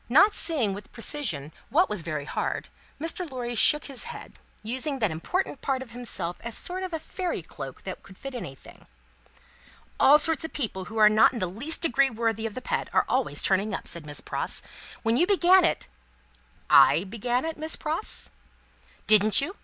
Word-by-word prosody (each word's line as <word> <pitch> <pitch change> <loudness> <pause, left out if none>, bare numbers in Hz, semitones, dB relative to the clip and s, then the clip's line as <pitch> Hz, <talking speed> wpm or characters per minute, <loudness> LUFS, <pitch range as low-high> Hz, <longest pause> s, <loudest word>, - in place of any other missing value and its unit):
Not 395 - +6
seeing 260 - 0
with 200 +1 -9
precision 215 - -3 0.2
what 350 +7 +3
was 210 -4 +2
very 155 -3 -4
hard, - - -3 0.3
Mr. 330 +2 -3
Lorry 245 -2 -4
shook 300 +6 +5
his 275 -3 -4
head; - - -9 0.3
using 260 +6 -2
that 215 -8 0
important 280 - -3
part 265 -1 -1
of 240 - -16
himself 230 -8 -3
as 235 -1 -5
a - - +2
sort 370 +1 -3
of 360 -4 -4
fairy 360 +3 -4
cloak - - -9
that - - -6
would 190 - -15
fit 275 -1 -7
anything. 135 - -9 1.1
"All 290 +2 +7
sorts 320 +1 +2
of 320 - -6
people 205 -9 -3
who 220 +4 -8
are 215 -1 +7
not 215 +4 +5
in - - -5
the 195 - -1
least 230 - -5
degree 275 -3 +3
worthy 225 -2 -1
of 215 - -9
the 255 - -6
pet, - - -2
are - - +3
always - - 0
turning 195 +2 +2
up," - - -7
said 165 -3 -1
Miss 145 - -5
Pross. - - -3 0.4
"When 225 +1 +2
you 350 - +3
began 375 -2 +5
it 335 - +1 0.5
" - - -34 0.2
"I 165 - +1
began 240 +6 -2
it, 325 0 -4
Miss 315 +1 -2
Pross?" 320 +6 -2 0.7
"Didn't 215 -1 +6
you? 325 +8 -1
245 Hz, 190 wpm, -26 LUFS, 205-315 Hz, 1.1 s, All